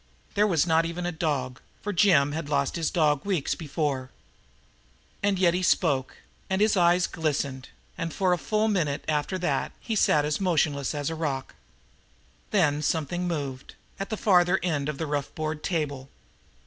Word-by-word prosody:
There 210 +1 +3
was 170 -6 +2
not 165 -1 +3
even 175 +1 -4
a 175 - -1
dog, 140 -6 -2 0.2
for 205 - -2
Jim 170 -7 +4
had 150 -1 -4
lost 140 -2 0
his 165 -2 0
one - - -14
dog 150 -4 +2
weeks 190 -8 0
before. 145 -4 -2 1.1
And 200 -1 +1
yet 180 -2 +4
he 180 - 0
spoke, 145 -7 +1 0.3
and 190 0 0
his 215 +1 +3
eyes 175 -1 +4
glistened, 140 -5 -2 0.3
and 165 -1 -2
for 185 +2 +1
a 175 - -1
full 215 +3 0
minute 165 -9 0
after 155 +4 0
that 180 -1 -1
he 225 - -3
sat 150 -7 +3
as 150 +4 -1
motionless 150 -6 +1
as 145 +1 -2
a - - -3
rock. 145 -5 -3 1.0
Then 150 -8 +2
something 165 +4 -1
moved 140 -6 -4 0.2
at 195 - -4
the 220 - -3
farther 180 -2 +4
end 150 -5 -1
of 150 - -4
the 160 - -2
rough 145 -1 -3
board 155 -1 -3
table. 145 -6 -2
160 Hz, 175 wpm, -26 LUFS, 145-180 Hz, 1.1 s, Jim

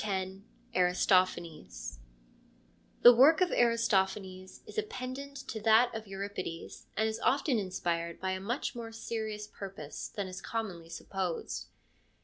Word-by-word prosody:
— 205 - -27
Aristophanes 180 - +1 1.0
The 245 - +12
work 280 +7 +7
of 365 -2 +3
Aristophanes 190 -5 +1
is - - -11
a - - +3
pendant 280 -7 -6
to 220 - -4
that 225 +3 +5
of 220 -1 -6
Euripides, 195 -3 -6
and 220 +1 +3
is 220 - -2
often 270 -2 +2
inspired 170 -3 -2
by 190 0 -1
a 190 - -2
much 240 +9 -2
more 230 -2 -6
serious 220 -2 -4
purpose 190 -8 -7
than 200 - -4
is 185 +1 -7
commonly 190 -8 -4
supposed. 185 0 -3
205 Hz, 130 wpm, -32 LUFS, 185-230 Hz, 1.0 s, The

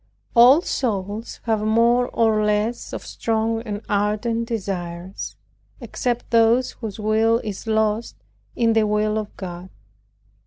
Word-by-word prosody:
All 250 +7 +8
souls 210 - -3
have 220 -2 0
more 235 +3 +3
or 220 -3 +2
less 210 +3 -1
of - - -6
strong 225 0 -1
and 210 -2 -5
ardent 215 +3 0
desires, 185 -4 -5 0.4
except 245 -2 -3
those 230 +2 +4
whose 220 -3 -7
will 220 +2 +2
is 210 +1 -6
lost 220 - 0 0.4
in 230 -1 +2
the 220 -1 +3
will 210 +1 +1
of 210 -1 -8
God. 180 -1 -7
220 Hz, 125 wpm, -22 LUFS, 210-230 Hz, 0.4 s, All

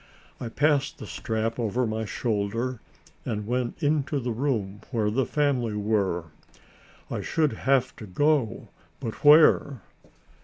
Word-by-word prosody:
I 120 - -5
passed 145 +2 +1
the - - -8
strap 110 +2 -3
over 120 +2 0
my 110 0 -2
shoulder 115 +3 -2 0.4
and 105 -2 -3
went 125 +6 -2
into 145 -1 +1
the 125 -1 -3
room 110 -5 -2
where 110 -5 0
the 130 +3 0
family 130 -7 0
were. 100 -6 -1 0.8
I - - -2
should 155 -6 0 0.2
have 130 -2 +3
to 110 - -9
go, 145 +4 0 0.3
but 115 - -6
where? 145 -4 +6
120 Hz, 130 wpm, -26 LUFS, 110-140 Hz, 0.8 s, where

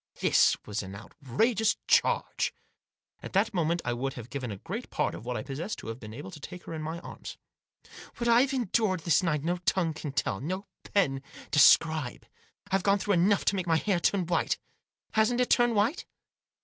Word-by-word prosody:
This - - +4
was 105 0 -3
an 95 0 -8
outrageous 210 - 0
charge. - - +2 0.7
At - - -9
that 200 +3 +2
moment 170 -1 0
I 120 - 0
would 130 +3 -3
have 120 -2 -9
given 130 -4 -4
a 100 - -5
great - - -6
part - - -1
of - - -9
what 125 -1 -2
I 110 - -4
possessed 155 +10 -5
to - - -8
have 115 +2 -6
been 110 -3 -9
able 145 +11 -8
to 160 - -10
take 180 +5 -9
her - - -7
in 160 - -4
my 160 +2 -4
arms. - - -9 0.4
" - - -17
What 235 - -2
I've 245 +4 +5
endured 220 -7 0
this 160 -2 +3
night 150 -5 0
no 175 +2 0
tongue 175 -2 0
can 155 -2 -6
tell, 100 -7 -1
no 185 +7 -3 0.2
pen 135 -10 +1 0.3
describe. 155 -2 +4 0.5
I've 195 0 +2
gone 200 +1 +3
through 200 +1 0
enough 190 +3 +3
to 200 - +3
make 185 -2 -2
my 165 -1 +3
hair 190 0 +1
turn 185 +1 +1
white. 170 0 0 0.5
Hasn't 220 +3 +2
it 250 - +1
turned 240 -1 +4
white 220 - +1
170 Hz, 200 wpm, -29 LUFS, 140-200 Hz, 0.7 s, I've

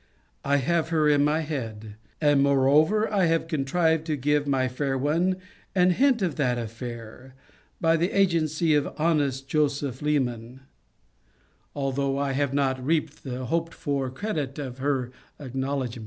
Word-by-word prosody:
I 140 0 +2
have 165 +4 0
her 155 -2 +2
in 145 -1 +4
my 150 +2 +2
head; 110 -9 -5 0.3
and 145 -2 +4
moreover 140 +9 +4
have 170 -6 +1
contrived 160 +1 +1
to 155 - 0
give 145 +1 0
my 135 -2 +1
fair 135 +1 -2
one 165 +7 +1 0.4
an 180 0 +4
hint 255 +1 +3
of 170 -6 -1
that 125 -5 +1
affair, 115 +2 -8 0.4
by 165 0 +3
the 170 +3 +1
agency 165 -4 +2
of 145 -1 0
honest 145 -5 0
Joseph 140 -3 -1
Leman;* 130 -4 -1 1.1
although 135 0 -1
I 140 -1 0
have 140 0 0
not 135 -2 0
reaped 155 +1 -1
the 130 -1 -5
hoped 165 +5 -2
for 140 -4 -2
credit 145 -2 -4
of 130 -3 -6
her 130 -3 -1 0.3
acknowledgement. 130 -2 -3
145 Hz, 145 wpm, -26 LUFS, 130-160 Hz, 1.1 s, in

